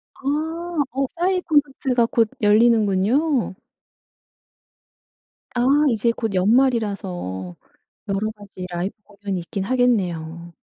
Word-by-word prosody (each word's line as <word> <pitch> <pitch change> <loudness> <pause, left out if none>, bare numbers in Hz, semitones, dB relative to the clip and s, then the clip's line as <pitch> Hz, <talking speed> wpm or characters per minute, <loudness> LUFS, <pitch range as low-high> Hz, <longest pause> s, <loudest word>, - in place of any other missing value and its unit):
아 320 +3 -2
어 270 +2 0
싸이 365 +2 +1
콘서트가 270 -6 +1
곧 230 -1 +1
열리는군요. 220 +4 +3 2.0
아 245 - -1 0.3
이제 230 0 +1
곧 225 -3 -3
연말이라서 190 - 0 0.5
여러 200 +2 -1
가지 200 -3 -10
라이브 175 +3 -3
공연이 200 -2 -5
있기는 190 +3 -5
하겠네요. 175 -10 0
220 Hz, 225 characters per minute, -22 LUFS, 190-265 Hz, 2.0 s, 열리는군요